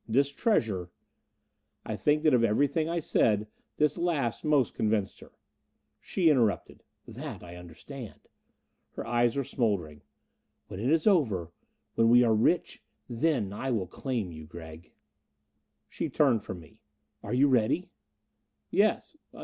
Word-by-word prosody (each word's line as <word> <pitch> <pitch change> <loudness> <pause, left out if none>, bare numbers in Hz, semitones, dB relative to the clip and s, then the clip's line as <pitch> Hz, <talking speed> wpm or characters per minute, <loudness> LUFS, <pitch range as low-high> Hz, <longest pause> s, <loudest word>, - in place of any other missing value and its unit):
This 135 +5 +2
treasure 110 - 0 0.5
" - - -50
I - - -3
think 150 +1 +1
that 155 -3 +4
of 120 -2 +4
everything 145 +8 +1
I 170 - -1
said, 110 -9 +2 0.3
this 150 +1 +1
last 150 -10 -1
most 145 -5 +2
convinced 105 -3 -1
her. - - -15 0.7
She 180 -3 0
interrupted, 120 - +1 0.3
"That - - -8
I 85 0 -10
understand." 90 - -11 0.7
Her - - -6
eyes 120 0 +1
were 140 - +1
smoldering. 95 - -2 0.7
"When 95 - -7
it 120 +5 -1
is 160 +1 +2
over 110 - +2 0.4
when 115 0 +3
we 120 +1 +7
are 115 -2 +3
rich 110 - +1 0.3
then 120 -5 0
I 135 +6 -4
will 110 -7 0
claim 110 0 -4
you, 80 -1 -10
Gregg." 80 0 -11 1.0
She - - -4
turned 130 -7 +2
from 90 - -7
me. 80 - -19 0.4
"Are - - -3
you 140 +3 +5
ready?" 130 - +1 0.8
"Yes. 215 +8 +1
120 Hz, 140 wpm, -29 LUFS, 100-145 Hz, 1.0 s, we